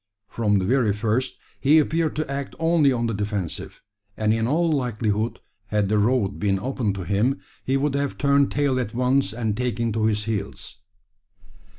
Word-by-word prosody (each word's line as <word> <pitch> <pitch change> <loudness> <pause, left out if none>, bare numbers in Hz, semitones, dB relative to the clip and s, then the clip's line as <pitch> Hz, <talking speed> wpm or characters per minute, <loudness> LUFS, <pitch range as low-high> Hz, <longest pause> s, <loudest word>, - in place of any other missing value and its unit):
From 105 -2 +1
the 95 - 0
very 120 -2 +2
first, 115 +5 -1 0.2
he 145 +3 +5
appeared 160 +1 +1
to 155 - -2
act 140 0 -4
only 165 -3 +3
on 120 -2 0
the 115 - -1
defensive; 100 -4 -4 0.3
and 110 0 +2
in 115 0 0
all 165 +5 +2
likelihood, 115 -5 -1 0.3
had 105 -2 0
the 105 0 +2
road 105 -2 +1
been 100 -2 +1
open 125 -2 -1
to 95 -2 -5
him, 110 +9 +1 0.2
he 135 +1 +1
would 140 0 0
have 140 0 -1
turned 140 -1 +3
tail 140 -3 +1
at 115 -3 -4
once, 125 -3 +2
and 110 -2 -2
taken 115 -1 -1
to 110 0 +1
his 105 -1 0
heels. 105 -2 -5
115 Hz, 180 wpm, -24 LUFS, 105-140 Hz, 0.3 s, he